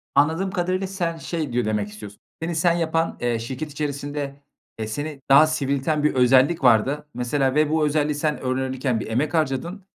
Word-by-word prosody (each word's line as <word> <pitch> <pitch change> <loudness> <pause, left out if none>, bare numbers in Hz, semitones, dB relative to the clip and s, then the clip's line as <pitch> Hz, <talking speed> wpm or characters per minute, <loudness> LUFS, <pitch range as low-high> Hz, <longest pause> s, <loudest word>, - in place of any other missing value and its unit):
Anladığım 165 +6 +2
kadarıyla 185 0 -1
sen 175 -4 -3
şey 160 -6 -4
diyo 120 -2 +1
demek 105 -1 -1
istiyorsun, 105 -1 -11 0.2
seni 165 0 -2
sen 170 +1 +3
yapan, 165 -1 0
eee, 120 -2 0
şirket 130 +6 -5
içerisinde, 145 -1 -4 0.4
eee, 110 - -3
seni 145 +5 -5
daha 145 +3 +8
sivrilten 145 0 -1
bir 150 - +3
özellik 130 +5 +4
vardı. 135 +6 +3
Mesela 130 +3 0
ve 155 0 +3
bu 155 -1 +2
özelliği 150 0 +1
sen 150 0 -1
öğrenirken 130 -1 -1
bir - - -5
emek 140 +7 -1
harcadın 165 +6 -1
145 Hz, 175 wpm, -23 LUFS, 130-160 Hz, 0.4 s, daha